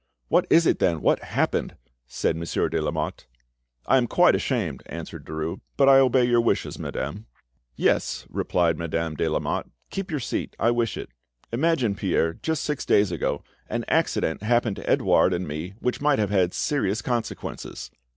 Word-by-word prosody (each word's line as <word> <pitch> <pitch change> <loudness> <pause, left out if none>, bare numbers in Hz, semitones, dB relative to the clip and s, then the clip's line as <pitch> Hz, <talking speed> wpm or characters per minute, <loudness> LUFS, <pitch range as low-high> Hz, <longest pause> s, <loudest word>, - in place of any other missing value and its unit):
"What - - +3
is 165 +1 +5
it, - - +2
then? 85 -3 +2
What - - +3
happened?" - - -1 0.3
said 75 - -1
Monsieur 85 0 -1
de - - -1
Lamotte. - - -3 0.6
"I 135 - +4
am 120 -2 +2
quite 180 +7 +5
ashamed," 95 - -1
answered - - -7
Derues; 80 +1 -4 0.2
"but 135 - +5
I 135 0 +8
obey 130 -1 +4
your 120 -1 +4
wishes, 115 - -1
madame." 100 +11 -5 0.5
"Yes," - - 0
replied 85 -2 +1
Madame 85 -1 -2
de 80 +2 -1
Lamotte, 75 - -2 0.2
"keep 195 -1 -4
your 155 -3 -1
seat, 120 - -3
I 115 - +3
wish 120 -2 0
it. - - -6 0.4
Imagine, 130 -3 +1
Pierre, 90 -4 0
just 160 - -2
six 150 -2 -2
days 100 -2 +3
ago, 75 -3 -2 0.3
an - - -2
accident 80 - +1
happened 115 -1 +1
to - - -6
Edouard 95 - +4
and 90 +1 -3
me 80 +6 -5
which 125 - -1
might 145 -1 +3
have 105 -2 0
had 95 -3 +2
serious 120 -7 0
consequences." 120 -3 -4
105 Hz, 170 wpm, -25 LUFS, 85-130 Hz, 0.6 s, I